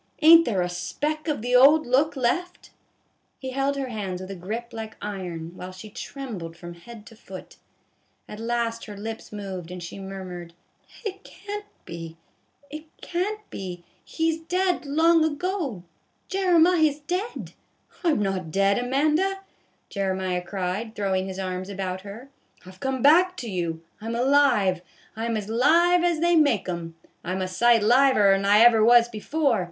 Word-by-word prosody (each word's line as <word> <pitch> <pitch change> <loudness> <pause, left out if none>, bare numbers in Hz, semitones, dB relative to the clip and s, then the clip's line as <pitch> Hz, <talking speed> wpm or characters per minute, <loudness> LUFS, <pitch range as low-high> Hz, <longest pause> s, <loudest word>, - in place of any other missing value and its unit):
Ain't 330 +1 +9
there 195 -6 0
a - - -1
speck 295 - -3
of 290 -8 -2
the 245 +1 +1
old 290 +5 +7
look 275 +5 +2
left? 315 +9 -2 0.3
" - - -45
He 260 -1 -6
held 275 +1 0
her 270 -2 -3
hands 195 -5 -4
with 185 +1 -8
a - - -5
grip 225 +7 -6
like 220 -1 -7
iron, 180 -5 -6
while 185 0 -8
she 185 +3 -11
trembled 200 - -7
from 175 0 -9
head 215 +5 -13
to 225 - -14
foot. 190 -3 -11 0.7
At 210 - -9
last 230 0 -2
her 210 -2 -9
lips 225 +2 -7
moved, 190 -5 -6
and 180 -1 -7
she 170 +4 -8
murmured: 185 -3 -8 0.3
" - - -21
It 395 -1 -5
can't 415 +1 -8 0.2
be, 165 -1 -8 0.5
it 305 +1 -8 0.2
can't 415 +4 -3
be; 180 -2 -7 0.2
he 325 0 0
's 320 - -5
dead 360 -1 -1
long 325 +3 +4
ago, 315 - -2 0.5
Jeremiah's 345 -5 +3
dead." 365 +9 -4 0.2
" - - -29
I 345 - +3
'm 290 -10 +2
not 190 -4 -2
dead, 195 +5 +2
Amanda," 305 +10 +1 0.5
Jeremiah 190 -2 -1
cried, 195 +4 -4
throw 200 -2 -1
ing 190 0 0
his 190 -1 -6
arms 185 0 -4
about 190 -2 -4
her, 215 +7 -10 0.2
" - - -29
I 185 - -10
've 185 - -19
come 265 +2 -2
back 355 +5 +5
to 245 - -6
you. 170 -5 -3 0.2
I 220 - -7
'm 230 - -2
alive, 240 -8 +3 0.3
I 225 +1 -3
'm 230 -1 -1
as 205 -2 -5
live 335 +10 +4
as 340 -3 +1
they 345 0 +3
make 285 - +3
'um, 170 -2 -5 0.3
I 180 - -3
'm 190 - -2
a - - -2
sight 230 +4 +3
liver 240 -3 +5
'n 195 0 0
I 205 +2 +5
ever 230 -2 +6
was 235 +1 +6
before. 240 +2 0
230 Hz, 180 wpm, -25 LUFS, 190-305 Hz, 0.7 s, Ain't